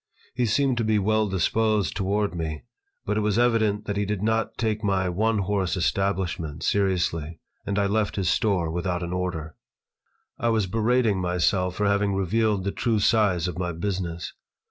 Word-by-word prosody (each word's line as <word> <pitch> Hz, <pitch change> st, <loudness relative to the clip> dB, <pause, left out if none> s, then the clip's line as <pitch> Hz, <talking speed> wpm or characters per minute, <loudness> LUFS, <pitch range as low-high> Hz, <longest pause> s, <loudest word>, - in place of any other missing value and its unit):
He 120 Hz, 0 st, 0 dB
seemed 130 Hz, +3 st, +2 dB
to -, -, +1 dB
be 110 Hz, -1 st, +2 dB
well 110 Hz, +1 st, +1 dB
disposed 105 Hz, 0 st, +1 dB
toward 100 Hz, +1 st, 0 dB
me, 80 Hz, -3 st, -4 dB, 0.4 s
but 105 Hz, -, -1 dB
it -, -, +3 dB
was 105 Hz, 0 st, +1 dB
evident 110 Hz, -3 st, +2 dB
that 105 Hz, -1 st, -3 dB
he 105 Hz, -, 0 dB
did 105 Hz, -1 st, -2 dB
not 110 Hz, 0 st, 0 dB
take 110 Hz, -1 st, -1 dB
my 95 Hz, -2 st, +1 dB
"one 110 Hz, +5 st, +1 dB
horse" 95 Hz, -2 st, 0 dB
establishment 90 Hz, -4 st, -1 dB
seriously, 85 Hz, -5 st, 0 dB, 0.3 s
and 100 Hz, 0 st, -1 dB
I 100 Hz, -, +2 dB
left 105 Hz, +1 st, 0 dB
his 95 Hz, -3 st, -1 dB
store 95 Hz, -6 st, +1 dB
without 90 Hz, +1 st, -2 dB
an 85 Hz, +1 st, -4 dB
order. 85 Hz, -4 st, -3 dB, 0.9 s
I 120 Hz, -, +1 dB
was 110 Hz, -3 st, +2 dB
berating 110 Hz, 0 st, +1 dB
myself 90 Hz, +1 st, +1 dB
for 105 Hz, -, 0 dB
having 100 Hz, 0 st, +2 dB
revealed 100 Hz, +1 st, +1 dB
the 100 Hz, -, -1 dB
true 115 Hz, +1 st, 0 dB
size 100 Hz, -5 st, +2 dB
of 90 Hz, -1 st, -5 dB
my 90 Hz, -1 st, -2 dB
business. 85 Hz, -1 st, -3 dB
100 Hz, 175 wpm, -25 LUFS, 90-110 Hz, 0.9 s, it